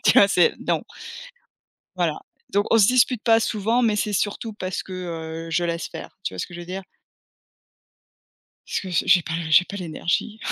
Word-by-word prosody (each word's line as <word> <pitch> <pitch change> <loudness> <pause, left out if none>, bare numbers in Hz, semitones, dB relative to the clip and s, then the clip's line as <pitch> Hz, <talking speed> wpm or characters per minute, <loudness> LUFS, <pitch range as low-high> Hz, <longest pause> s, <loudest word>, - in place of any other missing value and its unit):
tu - - +6
vois, 200 - +8
c'est 180 - +4
non. - - -1 1.1
Voilà. - - 0 0.3
Donc 205 +1 +1
on 230 - +5
se 200 - +6
dispute 250 -1 +3
pas 225 -1 +5
souvent, 225 +3 +1
mais 220 -3 +2
c'est 210 0 -1
surtout 205 +4 -1
parce 185 -3 -4
que, 190 - -11 0.5
heu, - - -8
je 175 +2 +1
laisse 170 0 -2
faire, - - -10
tu 95 - -3
vois - - -9
ce - - -2
que 175 - -13
je 175 - -7
veux 175 - -9
dire? 190 +2 -5 1.8
Parce - - -2
que 190 - -7
je 170 - +1
j'ai 180 - +6
pas 160 - -6 0.2
j'ai 180 - +6
pas 200 - -8
l'énergie 180 +4 -2
195 Hz, 200 wpm, -23 LUFS, 175-220 Hz, 1.8 s, vois